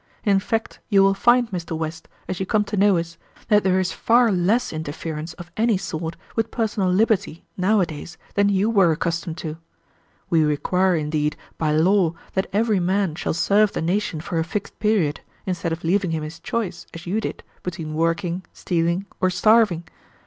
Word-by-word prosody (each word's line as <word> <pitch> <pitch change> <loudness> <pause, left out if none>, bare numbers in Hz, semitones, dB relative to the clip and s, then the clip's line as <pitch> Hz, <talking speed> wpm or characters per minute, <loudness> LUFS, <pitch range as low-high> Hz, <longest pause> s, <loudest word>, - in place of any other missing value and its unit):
In 200 -2 +3
fact, 225 +3 -3
you 200 -3 +5
will 195 0 +5
find, 240 +3 +3
Mr. 170 -3 -4
West, 160 0 -5 0.2
as 185 - -3
you 190 - -1
come 210 +1 +2
to 210 - -4
know 200 -1 +4
us, 165 0 -4 0.3
that 210 -1 +5
there 190 0 +3
is 185 0 0
far 235 0 +3
less 195 +6 +1
interference 155 +1 -5
of 175 +1 -11
any 225 -2 +3
sort 165 -3 -4 0.2
with 225 -1 0
personal 210 -5 0
liberty 190 -3 +1
nowadays 180 -4 0 0.2
than 200 0 +3
you 200 +1 +2
were 195 -7 +4
accustomed 165 +1 -2
to. 160 -2 -5 0.7
We 165 -4 +3
require, 180 +5 +2
indeed, 150 -1 -1 0.2
by 155 -2 +1
law 170 +1 +3 0.2
that 190 - -1
every 215 0 +2
man 185 -1 +1
shall 160 - -2
serve 200 +5 +3
the - - -2
nation 175 -2 -1
for 165 +1 -2
a - - +2
fixed 200 +4 -5
period, 200 -9 +1 0.2
instead 175 -2 -2
of 165 +1 -4
leaving 185 +2 +1
him 160 -1 -2
his 155 +2 -7
choice, 215 +3 -3
as 165 - -8
you 200 +5 -1
did, - - -5 0.2
between 165 -4 -5
working, 170 +3 0
stealing, 170 +2 0
or 185 - +3
starving. 190 -1 +4
180 Hz, 180 wpm, -23 LUFS, 165-205 Hz, 0.7 s, you